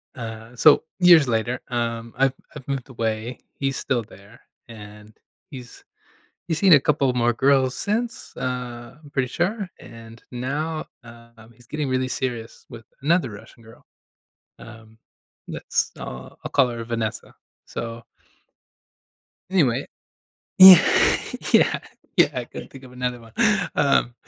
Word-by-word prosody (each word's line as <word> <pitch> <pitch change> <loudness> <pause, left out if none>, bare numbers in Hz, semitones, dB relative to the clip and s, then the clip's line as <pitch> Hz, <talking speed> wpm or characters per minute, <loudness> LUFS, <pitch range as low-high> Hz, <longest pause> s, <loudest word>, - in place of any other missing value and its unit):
uh 115 0 -8
so, 150 +5 +6 0.2
years 175 -6 +7
later, 120 +2 -1
um, 115 -1 -3
I've 135 -1 +2 0.2
I've 130 - -12
moved 135 -1 -4
away, 115 0 -3 0.2
he's 135 -1 -1
still 120 -4 -1
there, 100 +2 -17 0.3
and, 105 -1 -13 0.4
he's 125 -4 -11 0.7
he's 160 -2 -1
seen 190 -2 +6
a 145 - +6
couple 140 -2 +1
more 120 -1 +2
girls 130 +1 +2
since, 230 +3 -3
uh, 125 -1 -5
I'm 145 - -15
pretty 130 -3 -1
sure, 190 - -2
and 115 0 -13
now, 150 +6 -3 0.2
um, 115 -1 -16
he's 120 +2 -21
getting 150 +2 -3
really 130 0 0
serious 120 -3 -5
with 115 - -11 0.2
another 160 -3 +2
Russian 105 +2 -13
girl, 115 0 -17 0.8
um, 110 -1 -14 0.5
let's, - - -2
uh, 65 +1 -8
I'll - - -6
call 125 - +3
her 115 -1 -5
Vanessa, 115 -1 -4 0.3
so 115 0 -7 1.5
anyway 140 -8 +2 0.7
Yeah, 185 -2 +12 0.7
yeah, - - +4 0.4
yeah, - - +6
I - - -3
couldn't - - -10
think 135 - -13
of 125 - -14
another 125 -1 -3
one, 115 -1 -16 0.4
um 140 -4 +2
125 Hz, 135 wpm, -23 LUFS, 115-140 Hz, 1.5 s, Yeah